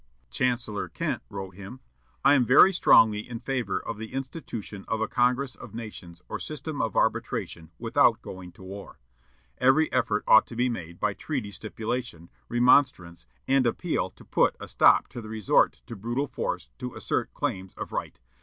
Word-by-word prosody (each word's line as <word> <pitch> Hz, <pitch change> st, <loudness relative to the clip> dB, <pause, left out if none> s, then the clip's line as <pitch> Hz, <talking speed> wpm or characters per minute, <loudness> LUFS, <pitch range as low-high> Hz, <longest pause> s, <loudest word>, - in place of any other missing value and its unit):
Chancellor 120 Hz, -4 st, -1 dB
Kent -, -, -3 dB
wrote 95 Hz, -1 st, -7 dB
him, 100 Hz, +7 st, -10 dB, 0.5 s
"I 140 Hz, -, +7 dB
am 135 Hz, -3 st, +5 dB
very 130 Hz, +10 st, +7 dB
strongly 110 Hz, -, +5 dB
in 120 Hz, -2 st, -5 dB
favor 120 Hz, -6 st, -2 dB
of 115 Hz, -2 st, -6 dB
the 110 Hz, 0 st, -7 dB
institution 130 Hz, -, -6 dB
of 110 Hz, -, -1 dB
a 110 Hz, -, 0 dB
congress 125 Hz, +2 st, +1 dB
of -, -, -11 dB
nations 90 Hz, -7 st, -9 dB
or -, -, -5 dB
system 155 Hz, 0 st, -5 dB
of 115 Hz, -, -2 dB
arbitration 80 Hz, -2 st, -1 dB
without -, -, +3 dB
going 95 Hz, -1 st, -9 dB
to 95 Hz, -, -15 dB
war. 100 Hz, +2 st, -9 dB, 0.6 s
Every 140 Hz, +5 st, +4 dB
effort 105 Hz, -4 st, +1 dB
ought 110 Hz, -, +7 dB
to 115 Hz, -, -9 dB
be 125 Hz, +2 st, +1 dB
made 85 Hz, -7 st, -6 dB
by 105 Hz, -1 st, 0 dB
treaty 125 Hz, -4 st, -4 dB
stipulation, 110 Hz, -3 st, -5 dB, 0.2 s
remonstrance, 120 Hz, -, +3 dB, 0.2 s
and 135 Hz, -2 st, +3 dB
appeal 115 Hz, -, -1 dB
to -, -, -18 dB
put -, -, +2 dB
a -, -, -8 dB
stop -, -, +5 dB
to 120 Hz, -, -7 dB
the 110 Hz, -, -9 dB
resort 110 Hz, -3 st, +2 dB
to 115 Hz, -, -8 dB
brutal 120 Hz, +7 st, -2 dB
force -, -, -4 dB
to 125 Hz, -1 st, -6 dB
assert -, -, -2 dB
claims 95 Hz, 0 st, -3 dB
of -, -, -6 dB
right. -, -, -4 dB
115 Hz, 175 wpm, -27 LUFS, 100-125 Hz, 0.6 s, I